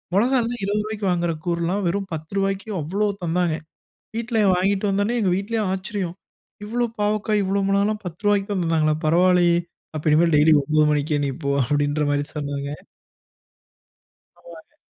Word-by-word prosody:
மொளகால்லாம் 240 +1 +1
20 205 +1 0
ரூவாய்க்கு 215 -2 -3
வாங்ற 175 -1 0
கூர்றலாம் 175 +3 -1
வெறும் 195 +2 -2
10 160 +2 -7
ரூவாய்க்கு 195 +1 -1
அவ்ளோ 195 +8 -1 0.2
தந்தாங்க. 170 -1 +1 0.6
வீட்ல 230 0 -1 0.2
வாங்கிட்டு 195 +3 +1
வந்தோன்னே, 205 +5 0
எங்க 185 -3 +2
வீட்லயும் 210 0 -1
ஆச்சரியம். 190 -2 -4 0.5
"இவ்ளோ 240 +3 0
பாவக்காய் 210 0 +1
இவ்ளோ 195 +1 0
மொளகால்லாம் 205 +2 +1
பத்து 170 +2 -7
ருவாய்க்குதான் 200 -2 +1
தந்தாங்களா 155 -2 +2
பரவாயில்லயே! 175 +1 +4 0.4
அப்ப 150 - -5
இனிமேல் 165 +1 +4
டெய்லி 155 +2 +6
9 155 +2 +2
மணிக்கே 150 0 0
நீ - - -1
போ." 140 - 0
அப்டின்ற 145 +3 0
மாரி 145 0 0
சொன்னாங்க. 140 -1 -3 1.7
ஆமாங்க. - - -15
185 Hz, 140 wpm, -22 LUFS, 160-205 Hz, 1.7 s, டெய்லி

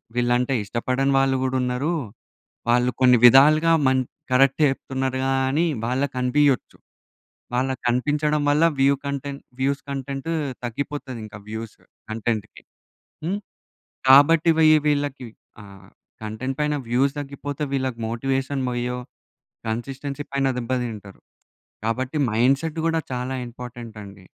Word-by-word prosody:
వీళ్ళంటే 120 +2 +1
ఇష్టపడని 130 +6 0
వాళ్ళు 135 0 +2
కూడా 130 0 -1
ఉన్నారు. 125 +5 -1 0.8
వాళ్ళు 125 +1 +3
కొన్ని 125 -1 +6
విధాలుగా 150 +6 +7 0.2
మన్ 130 0 +3 0.3
కరెక్టే 135 +4 +4
చెప్తున్నారు 130 -1 -3
గాని 135 +4 +1 0.2
వాళ్ళకి 130 +4 -1
కనిపియొచ్చు. 130 +1 +1 0.8
వాళ్ళకి 130 +1 -1
కనిపించడం 150 +4 +1
వల్ల 150 +3 +3 0.2
వ్యూ 140 +1 +4
కంటెంట్ 140 0 -4 0.2
వ్యూస్ 140 +2 0
కంటెంట్ 135 +2 -4 0.3
తగ్గిపోతాది 130 +1 -4
ఇంకా 105 -1 -10
వ్యూస్ 110 0 -6 0.3
కంటెంట్‌కి. 110 -1 -3 0.6
హ్మ్, 190 +4 -1 0.7
కాబట్టి 155 +5 +7 0.4
వీళ్ళకి 145 -3 -1 0.4
ఆహ్, 100 -1 -14 0.4
కంటెంట్ 130 +5 -4
పైన 150 0 +1
వ్యూస్ 135 +3 +2
తగ్గిపోతే 145 0 -5
వీళ్ళకి 130 -3 -2
మోటివేషన్ 135 +3 -1
పొయ్యో, 125 0 -2 0.7
కన్‌సిస్టెన్సీ 135 +5 -4
పైన 135 -1 +1
దెబ్బ 120 +1 -5
తింటారు. 105 -5 -8 0.6
కాబట్టి 130 +6 -2
మైండ్‌సెట్ 135 +8 +1
కూడా 165 0 +1
చాలా 125 +1 -3
ఇంపార్టెంట్ 120 -1 -9
అండి. 100 -2 -13
130 Hz, 115 wpm, -23 LUFS, 120-140 Hz, 0.8 s, విధాలుగా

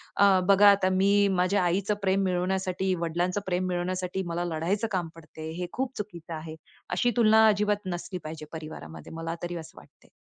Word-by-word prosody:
अ, 200 -2 +5
"बघा 200 +1 +7
आता 195 -2 +2
मी 200 +2 +4
माझ्या 185 +2 +2
आईचं 180 +2 +1 0.2
प्रेम 195 0 +2
मिळवण्यासाठी, 185 0 0
वडिलांचं 175 +4 -1
प्रेम 185 0 -1
मिळवण्यासाठी 180 +1 -2
मला 170 +1 -2
लढायचं 175 +7 -1
काम 180 -4 -1
पडते," 160 -1 -9
हे 180 - -2
खूप 265 0 -3
चुकीचं 175 -5 -7
आहे. 155 0 -7 0.3
अशी 240 +7 +1
तुलना 220 -1 +6
अजिबात 210 -1 +1
नसली 180 +1 -6
पाहिजे 155 0 -7
परिवारामध्ये, 80 - -8
मला 165 0 -4
तरी 175 0 -3
असं 160 -2 -9
वाटते. - - -22
185 Hz, 170 wpm, -27 LUFS, 170-200 Hz, 0.3 s, बघा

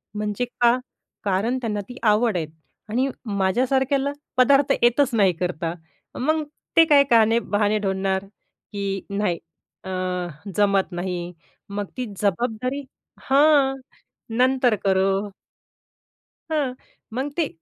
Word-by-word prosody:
म्हणजे 210 +3 -2
का? 240 0 +2 0.5
कारण 205 +5 0
त्यांना 210 -4 -2
ती 245 - -9
आवड 215 -1 +3
आहे 165 - -1 0.4
आणि 250 +5 +1 0.3
माझ्यासारख्याला? 265 +8 +1 0.3
पदार्थ 275 +2 +5
येतच 240 +3 +4
नाही 195 -4 +4
करता. 170 -2 -2 0.5
मग 310 +4 +1 0.3
ते 330 - +9
काय 290 -3 +6
कहाणे 225 0 +5
बहाणे 210 -1 +1
ढुंडणार? 190 -1 -1 0.5
की 200 -2 -3
नाही 200 -3 0 0.5
अ, 190 - -7 0.7
जमत 200 -2 +2
नाही 175 0 -4 0.4
मग 200 0 -3
ती 255 - -2 0.2
जबाबदारी 240 +7 -1 0.5
हां, 280 -1 +5 0.6
नंतर 255 -2 +3
करू. 195 +1 +2 1.2
हां. 290 -5 0 0.4
मग 265 +4 -2
ते 330 -4 +2
220 Hz, 110 wpm, -23 LUFS, 195-260 Hz, 1.2 s, ते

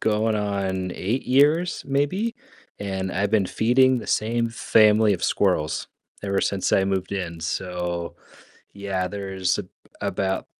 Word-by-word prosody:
going 110 0 +1
on 95 -3 -2
8 115 +8 -2
years 150 +7 +3
maybe? 145 - 0 0.4
And 95 -2 -3
I've 100 +2 0
been 105 -3 +3
feeding 130 +5 +3
the - - -8
same 115 +2 0
family 110 -2 +4
of 90 - -3
squirrels 75 0 +1 0.4
ever 100 -1 0
since 95 -2 -1
I 95 - +4
moved 95 -1 -2
in. 85 -4 -4
So 85 +1 -3 0.6
yeah, 95 -2 -2
there's 95 -2 -2
a - - -3 0.4
about 95 -1 -1
100 Hz, 135 wpm, -24 LUFS, 95-115 Hz, 0.6 s, family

